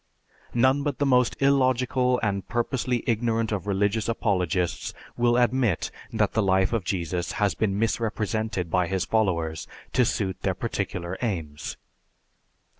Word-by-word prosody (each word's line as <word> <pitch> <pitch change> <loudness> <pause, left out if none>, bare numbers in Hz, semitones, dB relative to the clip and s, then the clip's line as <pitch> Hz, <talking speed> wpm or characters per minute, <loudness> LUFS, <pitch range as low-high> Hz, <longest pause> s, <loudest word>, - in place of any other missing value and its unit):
None 130 +4 +4
but 145 -2 -2
the 145 - +1
most 125 -3 +3
illogical 130 -2 +2
and 100 -2 -1
purposely 120 0 -1
ignorant 115 -1 0
of 100 -1 -3
religious 105 +3 +1
apologists 90 -6 0 0.2
will 120 0 +3
admit 120 -5 +2 0.2
that 110 -2 +1
the 110 - +2
life 95 +1 +2
of 115 -5 0
Jesus 90 -1 -2
has 105 -2 +1
been 100 -3 0
misrepresented 110 -4 -1
by 90 0 +2
his 95 0 -1
followers 85 -8 0 0.3
to 125 - +4
suit 100 -6 -1
their - - 0
particular 90 +1 -3
aims. 80 -10 -3
110 Hz, 135 wpm, -26 LUFS, 95-120 Hz, 0.3 s, None